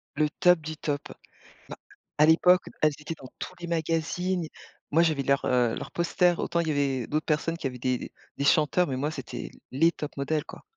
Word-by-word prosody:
Le 150 Hz, -1 st, +2 dB
top 180 Hz, -1 st, +6 dB
du 155 Hz, 0 st, -6 dB
top. 145 Hz, -2 st, -2 dB, 0.7 s
Bah -, -, -6 dB, 0.4 s
à 150 Hz, -, +6 dB
l'époque, 180 Hz, +3 st, +5 dB, 0.2 s
elles 155 Hz, -1 st, +4 dB
étaient 150 Hz, +2 st, -5 dB
dans 130 Hz, -, -11 dB
tous -, -, -6 dB
les 175 Hz, -, -6 dB
magazines. 165 Hz, +2 st, -1 dB, 0.4 s
Moi, 165 Hz, +3 st, +5 dB
j'avais 155 Hz, -4 st, +1 dB
leurs, 140 Hz, 0 st, +2 dB
heu, 120 Hz, -2 st, +2 dB
leurs -, -, -7 dB
posters. 175 Hz, 0 st, +2 dB
Autant, 170 Hz, -, 0 dB
il 165 Hz, -, -3 dB
y -, -, +2 dB
avait 135 Hz, -4 st, 0 dB
d'autres 155 Hz, +1 st, -1 dB
personnes 165 Hz, +2 st, 0 dB
qui 140 Hz, -, -2 dB
avaient 125 Hz, -, -6 dB
des 125 Hz, 0 st, 0 dB
des -, -, -8 dB, 0.3 s
des 140 Hz, -, -1 dB
chanteurs, 155 Hz, +5 st, +3 dB
mais 130 Hz, -, -2 dB
moi, 145 Hz, +4 st, -1 dB
c'était 130 Hz, -5 st, -7 dB, 0.2 s
les 165 Hz, +6 st, +4 dB
tops 150 Hz, -3 st, -7 dB
modèles, 150 Hz, +2 st, -1 dB
quoi. -, -, -11 dB
155 Hz, 210 wpm, -27 LUFS, 140-170 Hz, 0.7 s, top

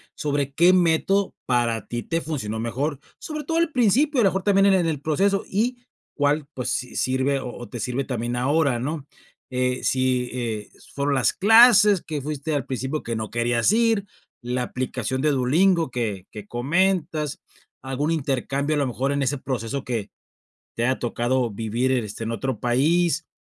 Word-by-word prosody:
sobre 140 Hz, -2 st, -2 dB
qué 175 Hz, +5 st, +5 dB
método 185 Hz, +3 st, +2 dB
para 120 Hz, -3 st, 0 dB
ti 120 Hz, -1 st, -4 dB
te 165 Hz, 0 st, -2 dB
funcionó 110 Hz, -9 st, -4 dB
mejor, 135 Hz, +5 st, -2 dB, 0.2 s
sobre 305 Hz, -1 st, -5 dB
todo 330 Hz, -, -1 dB
al 335 Hz, -1 st, +2 dB
principio, 255 Hz, +4 st, +3 dB
a -, -, +3 dB
lo 195 Hz, -, +5 dB
mejor 190 Hz, 0 st, -3 dB
también 195 Hz, -1 st, +4 dB
en 195 Hz, -, +5 dB
en 180 Hz, -3 st, +2 dB
el 150 Hz, -4 st, -1 dB
proceso 195 Hz, +7 st, +1 dB
y 240 Hz, +5 st, 0 dB, 0.4 s
cuál, 145 Hz, 0 st, +1 dB
pues 125 Hz, -, -3 dB
si 125 Hz, -, -3 dB
sirve 130 Hz, +2 st, +1 dB
o 125 Hz, -, -6 dB
o 120 Hz, -, -9 dB
te 120 Hz, -, -7 dB
sirve 125 Hz, +5 st, -2 dB
también 120 Hz, -2 st, -3 dB
ahora, 140 Hz, 0 st, +1 dB
¿no?, 145 Hz, +3 st, -4 dB, 0.5 s
eh, 125 Hz, 0 st, -1 dB
si, 130 Hz, -1 st, +1 dB
eh, 115 Hz, -4 st, -4 dB, 0.3 s
fueron 140 Hz, 0 st, 0 dB
las 130 Hz, -5 st, +2 dB
clases 210 Hz, -2 st, +6 dB
que 155 Hz, -2 st, -4 dB
fuiste 150 Hz, +1 st, -3 dB
al 140 Hz, -, -1 dB
principio 135 Hz, +3 st, -3 dB
que 115 Hz, 0 st, -3 dB
no 110 Hz, -1 st, -4 dB
querías 120 Hz, -, +1 dB
ir, 225 Hz, -3 st, +2 dB, 0.4 s
la 125 Hz, +1 st, -2 dB
aplicación 130 Hz, 0 st, -3 dB
de 150 Hz, -, +2 dB
Duolingo 160 Hz, +5 st, +2 dB
que 105 Hz, -7 st, -3 dB
que 105 Hz, -1 st, -9 dB
comentas, 155 Hz, -, 0 dB, 0.4 s
algún 135 Hz, +4 st, -2 dB
intercambio 140 Hz, 0 st, -1 dB
a -, -, +1 dB
lo 140 Hz, -, +1 dB
mejor, 135 Hz, +3 st, -1 dB
en 140 Hz, 0 st, 0 dB
ese 135 Hz, +2 st, 0 dB
proceso 130 Hz, 0 st, -4 dB
que 115 Hz, -5 st, -3 dB, 0.7 s
te 115 Hz, -, 0 dB
haya 130 Hz, +1 st, +1 dB
tocado 120 Hz, 0 st, -1 dB
vivir, 115 Hz, +5 st, -1 dB
este, 115 Hz, -4 st, -2 dB
en 115 Hz, -, -3 dB
otro 115 Hz, +1 st, -3 dB
país, 160 Hz, +6 st, +1 dB
135 Hz, 180 wpm, -23 LUFS, 120-165 Hz, 0.7 s, clases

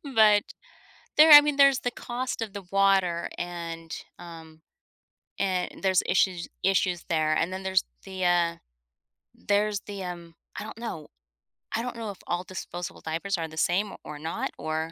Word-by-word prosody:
but 210 Hz, -2 st, +6 dB, 0.8 s
There 310 Hz, +1 st, +9 dB
I 295 Hz, -, +13 dB
mean, 295 Hz, -1 st, 0 dB
there's 275 Hz, -2 st, +6 dB
the 245 Hz, -, -1 dB
cost 250 Hz, 0 st, -4 dB
of 210 Hz, -3 st, -4 dB
the 200 Hz, -2 st, -7 dB
water, 195 Hz, -3 st, +2 dB
and, 170 Hz, -2 st, -6 dB, 0.3 s
um, 160 Hz, -2 st, -12 dB, 0.8 s
and 185 Hz, -2 st, -1 dB
there's 190 Hz, -1 st, +3 dB
issues 180 Hz, -2 st, +1 dB, 0.2 s
issues 185 Hz, -2 st, +1 dB
there. 155 Hz, -1 st, +2 dB
And 180 Hz, +4 st, 0 dB
then 190 Hz, 0 st, -5 dB
there's 190 Hz, -1 st, +2 dB, 0.2 s
the, 190 Hz, -1 st, -4 dB
uh, 170 Hz, -1 st, +2 dB, 0.8 s
there's 205 Hz, 0 st, 0 dB
the, 200 Hz, -2 st, -6 dB
um, 170 Hz, -2 st, -7 dB, 0.2 s
I -, -, -4 dB
don't 220 Hz, +1 st, -9 dB
know. 170 Hz, -10 st, -6 dB, 0.7 s
I 230 Hz, -, 0 dB
don't 250 Hz, -1 st, -5 dB
know 225 Hz, -2 st, -5 dB
if 190 Hz, -, -12 dB
all 175 Hz, +1 st, -1 dB
disposable 175 Hz, -1 st, -7 dB
diapers 170 Hz, +5 st, -2 dB
are 165 Hz, -1 st, -3 dB
the 160 Hz, 0 st, -13 dB
same 195 Hz, +5 st, +1 dB
o -, -, -10 dB
or 150 Hz, -, -7 dB
not 160 Hz, +2 st, -3 dB
or 160 Hz, +1 st, -3 dB
185 Hz, 170 wpm, -27 LUFS, 170-205 Hz, 0.8 s, I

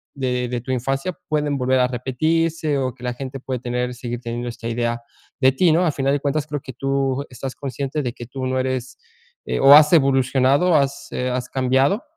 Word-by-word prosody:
de 125 Hz, -2 st, -1 dB
de 120 Hz, -2 st, -3 dB
tu 130 Hz, -, -5 dB
infancia 135 Hz, +7 st, -1 dB, 0.2 s
pueden 150 Hz, -2 st, 0 dB
volver 130 Hz, 0 st, +2 dB
a 125 Hz, -, +3 dB
repetirse 155 Hz, +5 st, 0 dB
o 130 Hz, -2 st, -1 dB
que 125 Hz, -, -15 dB
la 125 Hz, 0 st, -2 dB
gente 135 Hz, +1 st, -7 dB
puede 130 Hz, -1 st, -4 dB
tener 125 Hz, 0 st, -2 dB
seguir 120 Hz, -1 st, -5 dB
teniendo 120 Hz, +1 st, -4 dB
esta 115 Hz, 0 st, -7 dB
idea 120 Hz, 0 st, -1 dB, 0.4 s
de 130 Hz, 0 st, +6 dB
ti, 170 Hz, +4 st, +3 dB
¿no? 170 Hz, +3 st, +3 dB
A 160 Hz, -, +2 dB
final 135 Hz, -1 st, 0 dB
de 145 Hz, -, +1 dB
cuentas 145 Hz, +1 st, -1 dB
creo 145 Hz, -2 st, -4 dB
que 130 Hz, -, -9 dB
tú 135 Hz, +1 st, -1 dB
estás 130 Hz, +1 st, -6 dB
consciente 140 Hz, +2 st, -4 dB
de 120 Hz, -2 st, -3 dB
que 120 Hz, -, -9 dB
tú 130 Hz, +1 st, -5 dB
no 130 Hz, 0 st, 0 dB
eres 130 Hz, -1 st, -3 dB, 0.6 s
o 135 Hz, +1 st, +9 dB
has 150 Hz, 0 st, +7 dB
evolucionado, 135 Hz, +3 st, +3 dB
has, 140 Hz, -2 st, 0 dB
eh, 125 Hz, 0 st, -2 dB
has 125 Hz, 0 st, -3 dB
cambiado 135 Hz, -, +1 dB
130 Hz, 205 wpm, -21 LUFS, 125-140 Hz, 0.6 s, o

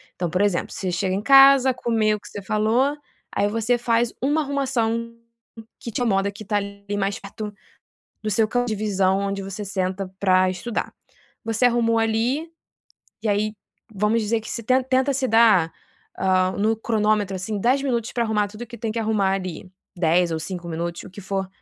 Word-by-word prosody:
Então, 175 Hz, -2 st, -2 dB
por 180 Hz, +3 st, 0 dB
exemplo 205 Hz, -4 st, 0 dB
você 185 Hz, -2 st, -3 dB
chega 185 Hz, +1 st, -1 dB
em 200 Hz, -, -1 dB
casa, 270 Hz, 0 st, +7 dB
comeu 220 Hz, -3 st, +1 dB
o -, -, -16 dB
que -, -, -14 dB
você 205 Hz, -, -7 dB
falou, 220 Hz, +8 st, +1 dB, 0.4 s
aí 205 Hz, -, +2 dB
você 225 Hz, +3 st, +1 dB
faz 235 Hz, 0 st, +1 dB
uma 290 Hz, +4 st, +2 dB
arrumação 230 Hz, -5 st, -1 dB, 0.6 s
que 235 Hz, -, -7 dB
te 225 Hz, -, -3 dB
incomoda 200 Hz, -3 st, +1 dB
que 210 Hz, +2 st, -10 dB
está 205 Hz, +1 st, 0 dB
ali 200 Hz, 0 st, -5 dB
mais 195 Hz, 0 st, -1 dB
perto 210 Hz, +1 st, -7 dB, 0.7 s
do 215 Hz, -, -1 dB
seu 220 Hz, +2 st, +2 dB
campo 245 Hz, +2 st, 0 dB
de 215 Hz, -, -1 dB
visão 195 Hz, -2 st, +1 dB
onde 200 Hz, 0 st, -2 dB
você 195 Hz, +2 st, -6 dB
senta 190 Hz, 0 st, -2 dB
para 185 Hz, -1 st, +4 dB
estudar. 200 Hz, +6 st, -4 dB, 0.5 s
Você 225 Hz, +2 st, +1 dB
arrumou 230 Hz, -1 st, +3 dB
ali, 235 Hz, +8 st, 0 dB, 0.7 s
e 220 Hz, -, -1 dB
aí 210 Hz, +1 st, +1 dB, 0.4 s
vamos 210 Hz, +3 st, +1 dB
dizer 220 Hz, +2 st, 0 dB
que 220 Hz, -, -10 dB
você 230 Hz, -, -4 dB
ten 255 Hz, +4 st, +3 dB
tenta 260 Hz, +1 st, +2 dB
se 265 Hz, 0 st, 0 dB
dar, 215 Hz, -7 st, +5 dB, 0.5 s
hã, 185 Hz, -1 st, +2 dB
no 220 Hz, +2 st, +2 dB
cronômetro, 215 Hz, -3 st, 0 dB
assim, 205 Hz, +3 st, -3 dB
10 260 Hz, +5 st, +2 dB
minutos 235 Hz, -4 st, -1 dB
para 240 Hz, -, 0 dB
arrumar 210 Hz, -2 st, +1 dB
tudo 215 Hz, +3 st, -8 dB
que 235 Hz, +1 st, -11 dB
tem 225 Hz, -1 st, -3 dB
que 230 Hz, -, -3 dB
arrumar 215 Hz, -3 st, +1 dB
ali, 185 Hz, -2 st, -4 dB, 0.3 s
10 170 Hz, +1 st, +3 dB
ou 160 Hz, -, -1 dB
5 175 Hz, 0 st, -6 dB
minutos 170 Hz, +1 st, -4 dB
o -, -, -11 dB
que 205 Hz, -, -10 dB
for, 195 Hz, 0 st, -3 dB
215 Hz, 190 wpm, -23 LUFS, 195-235 Hz, 0.7 s, casa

